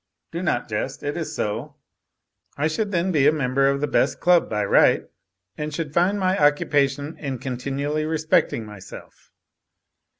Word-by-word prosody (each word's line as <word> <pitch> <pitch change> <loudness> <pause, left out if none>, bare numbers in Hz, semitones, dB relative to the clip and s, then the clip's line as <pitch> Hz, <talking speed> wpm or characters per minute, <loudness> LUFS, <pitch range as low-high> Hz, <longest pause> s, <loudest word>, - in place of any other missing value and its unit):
Do 170 - -4
not 125 -9 -1
jest, 115 +6 -4
it 145 0 -2
is 160 -2 -4
so. 120 +7 -3 0.8
I 145 +2 +1
should 200 +6 -2
then 180 0 0
be 145 -4 +3
a - - +6
member 135 -2 +1
of 140 0 -1
the 150 - +1
best - - +1
club 175 -1 +3
by 105 -2 -1
right, - - +4 0.6
and 150 0 -3
should 150 -1 -4
find 185 +5 +2
my 185 0 +1
occupation 145 0 +1
in 135 -4 -4
continually 140 +4 -3
respecting 155 -7 +1
myself. 105 -3 -12
145 Hz, 160 wpm, -23 LUFS, 135-160 Hz, 0.8 s, a